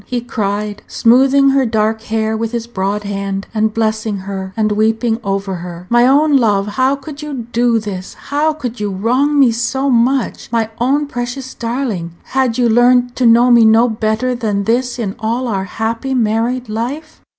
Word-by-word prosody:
he 245 - -2
cried, 210 -3 -3
smoothing 270 +4 +4
her 270 0 +3
dark 220 -1 0
hair 220 0 -1
with 225 +1 -3
his 235 -1 -2
broad 205 -2 -3
hand, 195 -1 -4
and 215 0 +1
blessing 220 -1 -1
her, 190 0 -6
and 215 -1 +1
weeping 225 +2 +1
over 195 -1 -2
her 175 0 -8
"my 240 +1 +5
own 290 +2 +4
love! 205 -5 +2
How 260 +6 +1
could 280 +1 -10
you 280 -6 -5
do 240 0 +2
this? 200 -4 -6
how 295 +2 -1
could 250 -6 -6
you 210 -1 -2
wrong 250 +10 +1
me 265 -4 +5
so 265 +4 -1
much? 250 +1 0
My 225 -2 0
own 275 +5 +1
precious 255 0 -5
darling! 230 -8 -3
had 260 -3 -1
you 245 -1 +3
learned 245 +1 +3
to 250 - +3
know 235 +2 +5
me 235 -1 +6
no 225 +2 +5
better 220 +2 -1
than 215 -5 -1
this 245 +3 0
in 205 -5 -3
all 235 +3 -2
our 195 -4 -2
happy 225 +6 -3
married 235 +2 0
life?" 255 +9 -5
230 Hz, 180 wpm, -16 LUFS, 215-255 Hz, -, me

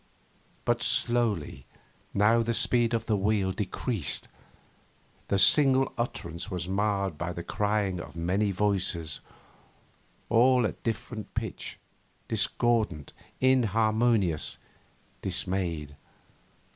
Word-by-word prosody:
But - - +1
slowly 110 - 0 0.4
now 110 +3 +4
the 115 0 -1
speed 120 0 +2
of 115 - -2
the 110 - +1
wheel 100 -1 +1
decreased; 100 - -2 1.0
the 100 - +1
single 135 +6 +5
utterance 90 -7 -4
was 90 -4 -4
marred 100 -3 -1
by 85 0 -3
the 85 - -6
crying 105 -3 -1
of 85 - -9
many 95 +5 0
voices, 95 -5 0 1.1
all 125 +1 +4
at - - -4
different 115 -1 -4
pitch, - - -4 0.5
discordant, 110 - 0 0.3
inharmonious, 110 - +2 0.6
dismayed. 90 -5 -2
105 Hz, 95 wpm, -28 LUFS, 90-115 Hz, 1.1 s, single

